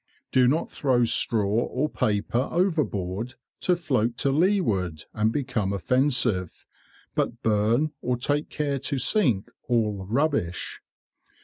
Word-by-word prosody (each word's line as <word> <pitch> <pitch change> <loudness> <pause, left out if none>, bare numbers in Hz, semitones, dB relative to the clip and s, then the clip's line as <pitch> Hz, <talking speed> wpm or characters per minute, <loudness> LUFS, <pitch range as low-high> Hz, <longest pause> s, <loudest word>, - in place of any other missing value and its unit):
Do 130 -1 +4
not 155 +6 0
throw 130 -4 +2
straw 115 -1 +2
or 120 +7 0
paper 120 0 0
overboard 125 - -1 0.2
to 180 - +2
float 125 -9 0
to 140 -1 +1
leeward 135 - +1
and 110 +1 +1
become 125 -7 -1
offensive; 115 - +1 0.5
but 120 0 -2
burn, 110 +8 +2
or 125 0 0
take 145 +4 -1
care 145 -2 -2
to 140 +1 -2
sink 125 - +2 0.2
all 105 -5 0
rubbish. 130 - -1
125 Hz, 120 wpm, -25 LUFS, 105-145 Hz, 0.5 s, Do